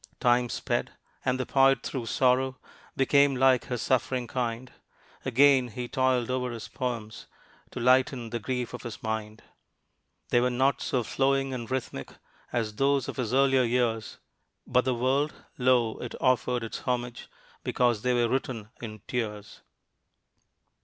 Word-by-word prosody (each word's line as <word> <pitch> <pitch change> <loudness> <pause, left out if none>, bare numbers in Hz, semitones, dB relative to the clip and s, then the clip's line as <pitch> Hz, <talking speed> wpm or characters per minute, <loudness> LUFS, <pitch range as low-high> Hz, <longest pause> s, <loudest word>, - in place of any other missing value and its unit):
Time 120 0 +3
sped. - - -2 0.3
And 130 0 0
the 130 - -1
poet 135 -2 +4
through 125 -4 -4
sorrow 130 +2 +2 0.4
Became 140 +1 +4
like 130 -1 +4
his 125 -4 -3
suffering 130 0 0
kind. 120 0 -3 0.5
Again 130 0 +5
he 120 +2 -6
toiled 130 -1 +1
over 125 -1 -1
his 115 -2 -6
poems 115 -4 -5 0.4
To - - -7
lighten 125 -1 +2
the 120 - -2
grief 125 +2 -3
of - - -6
his 120 -2 -8
mind. 110 0 -4 0.9
They 120 - +4
were 125 - +2
not 130 +3 +1
so 125 -2 0
flowing 135 +2 +1
and 120 -3 -5
rhythmic 130 - -4 0.4
As 110 -3 -2
those 140 -2 +2
of - - -6
his 120 -4 -2
earlier 135 0 +4
years, 115 -2 0 0.5
But 125 0 +2
the 130 -1 +1
world? 135 +5 +1 0.2
lo! 125 -3 +2
it 120 - -6
offered 125 -1 +1
its 115 - -5
homage 125 -1 -3 0.3
Because 120 -4 +1
they 125 +1 +1
were 120 -1 +3
written 115 -4 -3
in 110 -3 -7
tears. 105 -4 -4
125 Hz, 150 wpm, -28 LUFS, 115-130 Hz, 0.9 s, Again